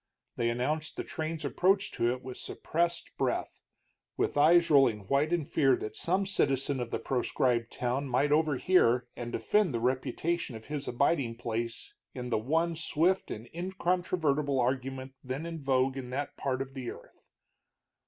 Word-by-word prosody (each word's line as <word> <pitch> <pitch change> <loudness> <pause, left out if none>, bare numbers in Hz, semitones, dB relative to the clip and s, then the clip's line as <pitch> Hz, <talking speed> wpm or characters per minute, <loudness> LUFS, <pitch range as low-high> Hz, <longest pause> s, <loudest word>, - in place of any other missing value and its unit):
They 115 0 +1
announced 150 +6 -2
the - - -2
train's 160 0 -4
approach 195 +2 +2
to 120 - +1
it 125 0 -5
with 130 -1 -7
suppressed 170 +1 -2
breath, - - -1 0.6
with - - 0
eyes 165 +3 +5
rolling 130 -7 +5
white 140 - +1
in 170 -4 +1
fear 135 -2 +3
that 110 - -6
some 185 +3 +1
citizen 140 -7 +1
of 120 -2 -3
the - - -1
proscribed 120 -1 0
town 125 +3 -1
might 135 +4 +2
overhear 150 -4 +3
and 120 0 -5
defend 205 - +1
the - - 0
reputation 130 +4 -1
of 110 0 -9
his 145 -1 -4
abiding 120 -1 +1
place 115 0 -4 0.2
in 125 -1 -5
the 110 - +2
one 165 +8 +1
swift 165 +4 +1
and 110 +2 -6
incontrovertible 170 -5 0
argument 130 +1 -1
then 130 +5 -4
in 165 -2 -5
vogue 135 -1 +2
in 130 -2 -6
that 140 +3 -3
part 135 -1 -1
of 135 0 -15
the 130 -3 -5
earth. - - -13
135 Hz, 165 wpm, -30 LUFS, 125-165 Hz, 0.6 s, eyes